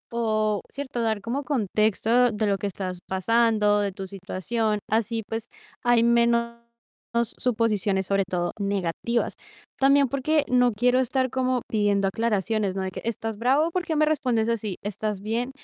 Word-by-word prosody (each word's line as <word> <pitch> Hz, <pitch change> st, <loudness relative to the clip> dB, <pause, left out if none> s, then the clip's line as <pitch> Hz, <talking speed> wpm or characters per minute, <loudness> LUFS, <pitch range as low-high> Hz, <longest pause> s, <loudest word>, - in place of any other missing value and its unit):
O 215 Hz, -3 st, +1 dB
cierto, 265 Hz, -4 st, -4 dB
dar 220 Hz, -2 st, 0 dB
como 250 Hz, +7 st, -3 dB
contexto 225 Hz, -1 st, +2 dB
de 215 Hz, 0 st, -1 dB
lo 200 Hz, -1 st, +1 dB
que 205 Hz, -, -2 dB
estás 185 Hz, -2 st, -5 dB
pasando, 210 Hz, +1 st, +2 dB
de 200 Hz, -1 st, 0 dB
tu 195 Hz, 0 st, -7 dB
situación. 200 Hz, +3 st, -2 dB
Así 225 Hz, +1 st, 0 dB
pues 225 Hz, 0 st, -4 dB, 0.4 s
hay 240 Hz, -1 st, +4 dB
menos 235 Hz, 0 st, +3 dB, 0.9 s
suposiciones, 215 Hz, -5 st, +1 dB
sobre 195 Hz, +1 st, +1 dB
todo 175 Hz, -1 st, -1 dB
negativas. 200 Hz, +4 st, -1 dB, 0.5 s
También 275 Hz, +1 st, +5 dB
porque 285 Hz, +3 st, +1 dB
no 245 Hz, -1 st, +4 dB
quiero 245 Hz, +4 st, +2 dB
estar 260 Hz, +1 st, 0 dB
como 255 Hz, -1 st, 0 dB
pidiendo 205 Hz, -2 st, +1 dB
aclaraciones, 210 Hz, -2 st, 0 dB
¿no? 190 Hz, -, -2 dB
De 190 Hz, -, -3 dB
que, -, -, -7 dB
¿estás 225 Hz, -1 st, -3 dB
bravo? 275 Hz, +8 st, +2 dB
¿Por 365 Hz, +1 st, -1 dB
qué 320 Hz, -, -1 dB
me 305 Hz, 0 st, +4 dB
respondes 255 Hz, -7 st, +1 dB
así? 215 Hz, -4 st, -2 dB
¿Estás 210 Hz, 0 st, -3 dB
bien? 230 Hz, +4 st, -2 dB
225 Hz, 155 wpm, -25 LUFS, 205-245 Hz, 0.9 s, También